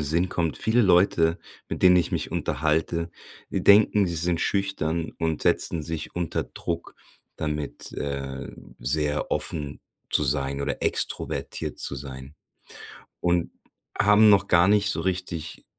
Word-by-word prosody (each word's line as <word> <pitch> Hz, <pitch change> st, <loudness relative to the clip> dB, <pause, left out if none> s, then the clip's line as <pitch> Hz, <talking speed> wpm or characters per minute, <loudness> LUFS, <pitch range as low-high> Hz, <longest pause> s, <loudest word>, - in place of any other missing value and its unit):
Sinn 80 Hz, +5 st, +1 dB
kommt. 85 Hz, -3 st, -2 dB
Viele 115 Hz, +2 st, +2 dB
Leute, 90 Hz, -3 st, +3 dB, 0.3 s
mit -, -, -5 dB
denen 90 Hz, -1 st, +7 dB
ich 85 Hz, -, +1 dB
mich -, -, -2 dB
unterhalte, 80 Hz, +2 st, -1 dB, 0.4 s
denken, 100 Hz, 0 st, +4 dB
sie 85 Hz, -1 st, -3 dB
sind 85 Hz, +1 st, 0 dB
schüchtern 85 Hz, -5 st, -1 dB
und 80 Hz, -2 st, -1 dB
setzen 80 Hz, -, +1 dB
sich 80 Hz, 0 st, -5 dB
unter 85 Hz, -3 st, -2 dB
Druck 85 Hz, 0 st, -6 dB, 0.4 s
damit, 75 Hz, -2 st, -4 dB
äh, 70 Hz, -1 st, -5 dB, 0.3 s
sehr 75 Hz, +4 st, 0 dB
offen 75 Hz, -3 st, -2 dB, 0.3 s
zu 75 Hz, -, +3 dB
sein 70 Hz, 0 st, 0 dB
oder 70 Hz, 0 st, -3 dB
extrovertiert -, -, -1 dB
zu -, -, -4 dB
sein 65 Hz, +1 st, -9 dB, 0.9 s
und 85 Hz, -1 st, 0 dB, 0.5 s
haben 105 Hz, +2 st, +6 dB
noch 100 Hz, -1 st, +4 dB
gar 85 Hz, +1 st, +4 dB
nicht 105 Hz, -1 st, +3 dB
so -, -, -1 dB
richtig 90 Hz, -3 st, -4 dB
85 Hz, 135 wpm, -25 LUFS, 75-90 Hz, 0.9 s, denen